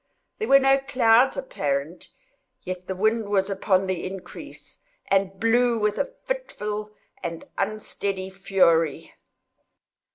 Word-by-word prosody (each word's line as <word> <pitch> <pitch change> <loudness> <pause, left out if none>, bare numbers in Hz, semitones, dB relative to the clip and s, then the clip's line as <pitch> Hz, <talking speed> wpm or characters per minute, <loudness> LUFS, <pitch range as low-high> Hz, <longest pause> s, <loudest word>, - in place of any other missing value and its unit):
There 440 - -2
were 275 - +8
no 270 0 +4
clouds 255 -2 +3
apparent, 145 - -3 0.5
yet 180 0 -6
the 190 - -3
wind 220 +2 +1
was 200 -1 +1
upon 195 -1 +1
the 185 -2 -2
increase, 190 0 -10 0.3
and 195 -1 +1
blew 235 +1 +3
with 210 -1 0
a - - -2
fitful 210 - -4 0.3
and 170 -2 -5
unsteady 200 -3 -3
fury. 170 -5 +1
200 Hz, 120 wpm, -25 LUFS, 185-230 Hz, 0.5 s, were